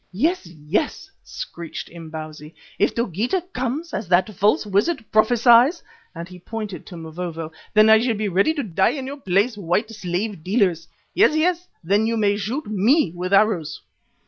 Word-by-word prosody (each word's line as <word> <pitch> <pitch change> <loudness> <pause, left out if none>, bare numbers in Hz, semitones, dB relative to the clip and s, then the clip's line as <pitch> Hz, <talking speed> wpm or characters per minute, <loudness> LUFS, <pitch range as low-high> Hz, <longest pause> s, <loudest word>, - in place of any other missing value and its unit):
"Yes, 290 - 0
yes," 170 - -3
screeched 170 -1 -7
Imbozwi. 155 -2 -9 0.2
"If - - +2
Dogeetah 240 - -2
comes, 265 +6 -3
as 205 - -3
that 180 +4 +2
false 205 +4 +2
wizard 220 - 0
prophesies," 240 +7 +4 0.3
and 170 +1 -7
he 180 -1 -12
pointed 210 0 -7
to 175 - -9
Mavovo, 165 0 -6 0.2
"then 215 0 +7
I 220 0 +7
shall 235 0 0
be 215 0 -1
ready 200 - +2
to 285 - -2
die 190 +3 +1
in 265 - -5
your 280 +2 -6
place, 205 0 +1
white 190 +5 -1
slave 190 -2 -4
dealers. 185 -4 +1 0.3
Yes, 310 - +4
yes, 350 +2 +1 0.2
then 200 +6 +2
you 230 0 0
may 205 -2 +2
shoot 220 +9 -3
me 215 - +2
with 180 +1 -4
arrows." 195 -6 +2
210 Hz, 165 wpm, -22 LUFS, 175-245 Hz, 0.3 s, then